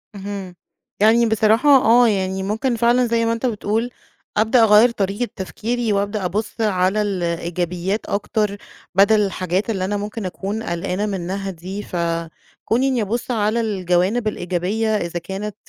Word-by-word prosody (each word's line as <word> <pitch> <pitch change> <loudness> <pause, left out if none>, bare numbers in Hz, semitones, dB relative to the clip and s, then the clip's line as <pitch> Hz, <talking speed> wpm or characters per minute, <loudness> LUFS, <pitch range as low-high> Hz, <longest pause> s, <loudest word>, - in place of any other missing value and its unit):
اهم، 195 -2 -6 0.5
يعني 225 +3 +5
بصراحة 220 +4 +3
آه، 245 -3 +6
يعني 190 -2 -1
ممكن 220 +5 -1
فعلًا 240 +2 +3
زي 230 0 +1
ما 230 - +1
أنتَ 230 +2 -3
بتقول، 225 0 -1 0.5
أبدأ 225 +3 +4
أغيّر 220 +2 +6
طريقة 205 +2 -2
تفكيري 225 +4 -2
وأبدأ 200 0 -1
أبُص 210 +5 -3
على 195 -1 +1
الإيجابيات 175 0 -2
أكتر، 210 0 -1 0.4
بدل 205 +2 +5
الحاجات 185 0 -1
اللي 190 -4 -1
أنا 205 +2 -1
ممكن 210 +1 -5
أكون 200 +4 -4
قلقانة 180 +1 -2
منها 195 0 -3
دي، 190 +4 -7
فكوني 170 +9 -2
إني 255 -3 +1
أبُص 230 +5 -2
على 220 0 +1
الجوانب 195 +1 0
الإيجابية 185 +3 -1
إذا 175 -2 -3
كانت 195 +4 -6
205 Hz, 140 wpm, -20 LUFS, 185-225 Hz, 0.5 s, آه